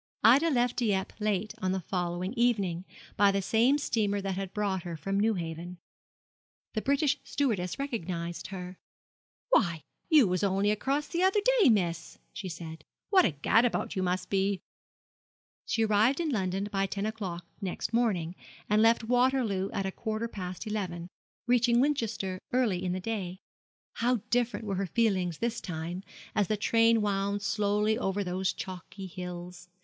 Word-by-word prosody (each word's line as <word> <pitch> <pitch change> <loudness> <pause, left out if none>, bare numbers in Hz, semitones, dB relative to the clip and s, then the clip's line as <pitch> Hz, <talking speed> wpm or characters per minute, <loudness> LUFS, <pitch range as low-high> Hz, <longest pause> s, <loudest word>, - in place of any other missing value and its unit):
Ida 270 +9 +6
left 245 -4 +1
Dieppe 200 -5 0
late 210 -1 0
on 185 0 +1
the 190 - 0
following 180 +2 -2
evening, 200 -8 +1 0.3
by 200 0 +6
the 195 - +1
same 230 +8 +3
steamer 210 -7 0
that 195 -1 -2
had 195 -1 -4
brought 200 -3 -1
her 170 -1 -6
from 195 +6 -1
Newhaven. 175 -4 -2 1.0
The 215 - -1
British 280 +2 +2
stewardess 215 -11 -1
recognised 175 -11 -4
her. 180 -1 -7 0.7
'Why, 170 - +3 0.3
you 300 - +7
was 180 +1 0
only 200 +1 +2
across 275 +7 0
the 340 - -2
other 380 +3 +4 0.2
day, 390 - +7
miss!' 175 -6 0 0.2
she 190 - -5
said; 160 -2 -8 0.3
'what 380 -2 +6
a - - +4
gad 155 +10 +3
about 245 - 0
you 190 - 0
must 180 0 -1
be!' 195 0 +1 1.1
She 225 -1 +2
arrived 220 +7 +3
in 325 -3 0
London 195 -3 -1
by 195 0 +1
ten 200 +1 -3
o'clock 190 -6 -4 0.2
next 195 +3 -3
morning, 195 -8 +1 0.3
and 210 +1 +3
left 230 +1 +4
Waterloo 245 -5 +2
at 195 - -2
a 190 - -1
quarter 220 +2 -3
past 185 -3 -6
eleven, 185 -5 -3 0.4
reaching 240 -1 +4
Winchester 225 -9 0
early 225 -8 +1
in 180 -1 -1
the 185 - -2
day. 190 -3 -3 0.6
How 245 +2 +2 0.2
different 245 -2 +1
were 195 -2 -2
her 195 0 -1
feelings 185 -7 +1
this 235 0 -2
time, 175 +1 -4 0.3
as 205 -3 +2
the 215 - 0
train 230 +1 +4
wound 200 0 0
slowly 210 +2 +1
over 195 -1 -1
those 185 +1 -1
chalky 185 +1 -7
hills! 180 -1 -8
200 Hz, 160 wpm, -29 LUFS, 185-230 Hz, 1.1 s, you